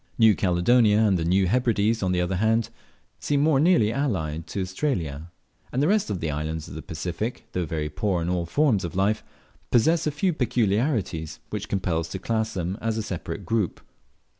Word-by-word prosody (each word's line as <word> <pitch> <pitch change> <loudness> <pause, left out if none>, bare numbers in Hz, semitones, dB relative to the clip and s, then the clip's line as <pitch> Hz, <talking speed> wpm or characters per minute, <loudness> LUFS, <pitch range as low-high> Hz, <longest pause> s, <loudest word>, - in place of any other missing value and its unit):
New 110 -2 +6
Caledonia 105 +5 +3
and 105 -3 +4
the - - -1
New 95 +3 +3
Hebrides, 115 0 +1
on 95 -2 +1
the 90 -1 +1
other 90 +1 -1
hand, 110 +3 +2 0.5
seem 145 -1 0
more 150 -2 +3
nearly 150 -10 +4
allied 85 - -2
to 100 - -4
Australia; 90 - -2 0.4
and 125 - -1
the 145 - +3
rest 205 - +2
of 100 -4 -2
the 80 -2 -1
islands 80 +1 -3
of - - -9
the 80 - -6
Pacific, 85 +10 -4
though 90 -3 -2
very 75 -1 -2
poor 95 +3 -1
in - - -3
all 90 -1 -1
forms 120 - +2
of 85 - -5
life, 100 +3 +1 0.5
possess 155 +7 +3
a - - +1
few 170 +5 0
peculiarities 110 - 0
which 105 -1 -4
compel 90 -4 0
us 85 - -4
to 95 - -5
class 110 +2 -2
them 90 +2 -3
as 115 0 -1
a 110 - -1
separate 95 -5 -5
group. 110 -5 -1
100 Hz, 195 wpm, -25 LUFS, 85-115 Hz, 0.5 s, New